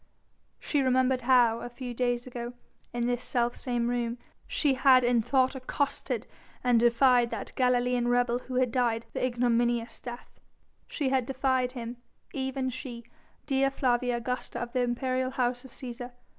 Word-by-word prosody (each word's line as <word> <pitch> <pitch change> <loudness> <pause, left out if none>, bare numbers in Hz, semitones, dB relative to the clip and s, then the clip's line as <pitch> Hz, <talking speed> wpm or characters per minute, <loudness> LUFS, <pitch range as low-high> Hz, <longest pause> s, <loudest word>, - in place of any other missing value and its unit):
She 290 - 0
remembered 260 0 +2
how, 240 -2 +4
a 240 - -6
few 245 0 -6
days 245 0 0
ago, 240 -1 -6 0.4
in 240 0 -1
this 245 0 -1
self 240 0 0
same 240 -3 -1
room 240 -1 -1 0.3
she 290 -3 +2
had 260 -1 +5
in 240 -1 +3
thought 260 +3 +2
accosted 270 +2 -2 0.4
and 245 -2 +4
defied 240 +1 +4
that - - -6
Galilean 250 -1 +2
rebel 245 0 +2
who 255 0 -7
had 250 -2 +2
died 235 -2 +1
the - - -2
ignominious 240 -1 +1
death; 240 0 -9 0.5
she 285 -4 -1
had 260 -2 +1
defied 260 -1 0
him, 240 -1 -6 0.4
even 265 -1 -2
she, 245 -2 -7 0.4
Dea 270 -1 +2
Flavia 245 -2 +1
Augusta 250 +1 -4
of 240 0 -5
the 255 - +1
imperial 255 +1 0
House 250 -1 -1
of - - -11
Cæsar. 245 0 -7
245 Hz, 155 wpm, -29 LUFS, 240-260 Hz, 0.5 s, had